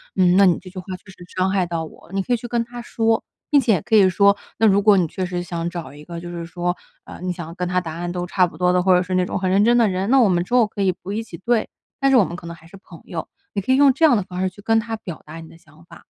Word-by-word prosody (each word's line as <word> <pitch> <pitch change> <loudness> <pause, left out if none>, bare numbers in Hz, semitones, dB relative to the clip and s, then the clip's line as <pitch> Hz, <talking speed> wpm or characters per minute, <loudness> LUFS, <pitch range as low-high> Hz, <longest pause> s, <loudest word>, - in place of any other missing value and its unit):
嗯， 180 -2 +4
那 200 - +7
你 180 -3 +4
这 185 - -12
句 185 +1 -8
话 180 - -10
确 - - -31
实 - - -19 0.2
伤 185 +1 +2
害 190 -2 +1
到 170 -1 -3
我。” 160 - -13
你 195 - +1
可 245 - -6
以 - - +2
去 240 - -8
跟 235 -1 0
他 240 +1 -9
说。 225 -1 0 0.3
并 290 - +6
且 220 - +2
可 225 +4 0
以 200 -3 +7
说： 200 +2 +4 0.2
“那 225 - +5
如 200 -1 +4
果 205 0 +5
你 180 -3 +2
确 185 +4 -4
实 180 0 -3
想 170 -1 -4
找 170 -6 -6
一 145 +1 -13
个， 170 +2 -7
就 175 - -8
是 170 -1 -6
说， 175 +1 -3 0.3
呃 - - -10
你 180 -1 -1
想 170 -2 -8
跟 180 0 -3
他 180 +1 0
答 160 -3 -6
案 175 +1 -4
都 175 0 -3
差 180 +1 +3
不 170 - -9
多 180 0 +3
的， 180 0 +2
或 185 0 +5
者 180 - +3
是 185 0 -3
那 185 0 +2
种 - - -3
很 185 0 -1
认 195 +3 +3
真 240 +1 +4
的 235 -2 +4
人， 185 +1 -2
那 270 -1 +6
我 220 - +4
们 175 -1 +1
之 185 - -9
后 245 -3 +5
可 200 -1 -4
以 190 - +3
不 185 +2 -9
一 220 +2 -2
起 200 - -11
对， 230 +3 +1 0.3
但 275 0 +3
是 265 - +6
我 225 - +6
们 175 - -5
可 175 - -10
能 170 0 -7
还 165 0 -18
是 195 - -13
朋 195 - -15
友。 - - -5 0.3
“你 200 - -1
可 260 - 0
以 - - +5
用 280 0 +6
这 275 +5 +3
样 295 - +5
的 210 - +1
方 180 -1 -7
式， 185 0 0
去 205 - -15
跟 225 +1 +2
他 225 0 -4
表 175 -6 -9
达 155 +2 -9
你 165 - -11
的 - - -16
想 155 0 -21
法。 - - -15
185 Hz, 365 characters per minute, -21 LUFS, 175-220 Hz, 0.3 s, 那